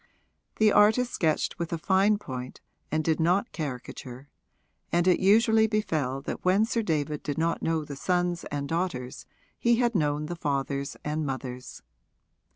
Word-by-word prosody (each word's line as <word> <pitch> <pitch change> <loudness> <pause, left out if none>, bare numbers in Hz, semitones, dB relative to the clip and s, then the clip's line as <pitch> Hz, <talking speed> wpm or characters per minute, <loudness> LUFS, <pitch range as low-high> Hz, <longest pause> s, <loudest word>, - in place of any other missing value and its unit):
The 215 -1 +4
artist 220 +5 +4
sketched 160 +3 0
with 170 0 -3
a 170 - -1
fine 195 +5 +3
point 130 -9 -7 0.3
and 155 +1 +1
did 160 +1 +1
not 180 +7 +2
caricature, 130 -2 -7 0.6
and 175 +1 +2
it 180 - +4
usually 220 +3 +4
befell 155 - -1
that - - -5
when 190 +4 +4
Sir 230 0 -1
David 150 -6 -1
did 145 -2 -4
not 165 +1 0
know 160 -2 0
the 145 - -7
sons 175 +3 0
and 140 -1 -4
daughters 165 -7 -3 0.3
he 235 0 +3
had 240 0 +1
known 150 -5 0
the 175 +3 -5
fathers 140 -2 -2
and 155 +1 -1
mothers. 130 -2 -6
165 Hz, 160 wpm, -27 LUFS, 140-195 Hz, 0.6 s, The